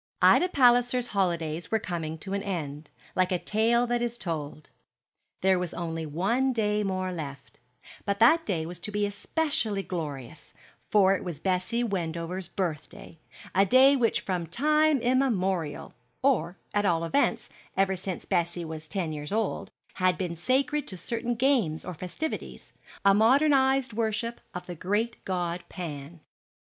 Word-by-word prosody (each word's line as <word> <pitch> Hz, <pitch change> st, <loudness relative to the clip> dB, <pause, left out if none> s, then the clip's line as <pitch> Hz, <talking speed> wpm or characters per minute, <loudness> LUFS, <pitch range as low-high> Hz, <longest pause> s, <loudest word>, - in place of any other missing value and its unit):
Ida 365 Hz, -, +6 dB
Palliser's 245 Hz, -4 st, +4 dB
holidays 170 Hz, -4 st, -1 dB
were 220 Hz, -, +2 dB
coming 165 Hz, -6 st, -4 dB
to 190 Hz, +5 st, -6 dB
an 200 Hz, -, -1 dB
end, 155 Hz, -6 st, -4 dB, 0.3 s
like 185 Hz, +1 st, +2 dB
a 180 Hz, -, +2 dB
tale 230 Hz, +6 st, +2 dB
that 240 Hz, 0 st, 0 dB
is 240 Hz, 0 st, -2 dB
told. 155 Hz, -5 st, -5 dB, 0.7 s
There 190 Hz, -1 st, +3 dB
was 180 Hz, -2 st, -4 dB
only 165 Hz, -2 st, -3 dB
one 230 Hz, -, +1 dB
day 210 Hz, -2 st, +1 dB
more 185 Hz, -2 st, -1 dB
left, 140 Hz, -5 st, -8 dB, 0.4 s
but 200 Hz, -1 st, -1 dB
that 315 Hz, +10 st, +6 dB
day 170 Hz, -, -2 dB
was 170 Hz, +1 st, -7 dB
to 210 Hz, +4 st, -4 dB
be 205 Hz, 0 st, 0 dB
especially 215 Hz, -1 st, -1 dB
glorious; 145 Hz, -9 st, -6 dB, 0.3 s
for 195 Hz, -2 st, +5 dB
it -, -, -5 dB
was 170 Hz, -5 st, -5 dB
Bessie 190 Hz, +7 st, 0 dB
Wendover's 175 Hz, -3 st, -3 dB
birthday, 165 Hz, -3 st, -5 dB, 0.3 s
a 195 Hz, -, +5 dB
day 260 Hz, +7 st, +6 dB
which 240 Hz, -4 st, +1 dB
from 180 Hz, -3 st, -2 dB
time 305 Hz, -, +3 dB
immemorial 195 Hz, -, 0 dB, 0.3 s
or, 190 Hz, -, +2 dB, 0.2 s
at 205 Hz, -, +2 dB
all 170 Hz, -4 st, +2 dB
events, 225 Hz, +13 st, 0 dB, 0.3 s
ever 195 Hz, 0 st, +3 dB
since 185 Hz, 0 st, -5 dB
Bessie 175 Hz, 0 st, 0 dB
was 160 Hz, -1 st, -7 dB
ten 165 Hz, 0 st, -2 dB
years 150 Hz, +1 st, -5 dB
old 220 Hz, 0 st, -1 dB, 0.2 s
had 185 Hz, -1 st, +2 dB
been 175 Hz, -3 st, -3 dB
sacred 270 Hz, -, 0 dB
to 185 Hz, -, -5 dB
certain 235 Hz, +5 st, -2 dB
games 230 Hz, -, +1 dB
or 180 Hz, -, -5 dB
festivities 185 Hz, -, -6 dB, 0.3 s
a 200 Hz, -, +7 dB
modernized 265 Hz, +2 st, +4 dB
worship 230 Hz, +1 st, -2 dB
of 180 Hz, 0 st, -5 dB
the 180 Hz, -, -6 dB
great 205 Hz, +7 st, -2 dB
god 175 Hz, -2 st, -2 dB
Pan. 160 Hz, -2 st, -7 dB
190 Hz, 150 wpm, -28 LUFS, 170-235 Hz, 0.7 s, a